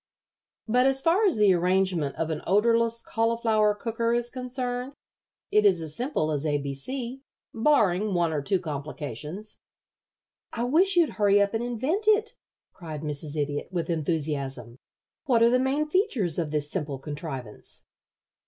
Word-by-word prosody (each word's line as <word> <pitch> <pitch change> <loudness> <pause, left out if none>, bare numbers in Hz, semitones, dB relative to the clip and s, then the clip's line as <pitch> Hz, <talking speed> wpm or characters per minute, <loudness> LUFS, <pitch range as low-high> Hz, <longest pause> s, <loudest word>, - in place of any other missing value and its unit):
But 250 +4 +3
as 270 0 +2
far 350 +8 +3
as 350 - +1
the 205 -3 +5
arrangement 180 -4 +1
of 165 0 -2
an 155 - -3
odorless 230 +3 +2
cauliflower 225 -2 +2
cooker 230 +2 -1
is 240 0 -1
concerned, 250 0 -4 0.6
it 210 - +4
is 195 -4 +4
as 155 -2 -6
simple 245 - -1
as 145 -1 -2
A 150 -2 +1
B 140 -1 -4
C, 255 - -5 0.3
barring 215 -6 +2
one 170 -2 +1
or 150 - -1
two 190 +6 0
complications." 150 - -6 0.9
"I 235 - -2
wish 350 +10 +3
you'd 340 -3 +2
hurry 205 0 +5
up 200 +1 +2
and 225 +1 -1
invent 260 - -1
it," 435 +1 +3 0.4
cried 155 -5 -7
Mrs. 150 0 -5
Idiot, 145 0 -2
with 175 -2 -2
enthusiasm. 140 -7 -3 0.5
"What 235 -4 +3
are 235 - +5
the 250 - +3
main 275 +4 0
features 275 - 0
of 160 -3 -1
this 150 0 -2
simple 150 -7 -3
contrivance?" 135 -5 -8
205 Hz, 155 wpm, -26 LUFS, 155-245 Hz, 0.9 s, the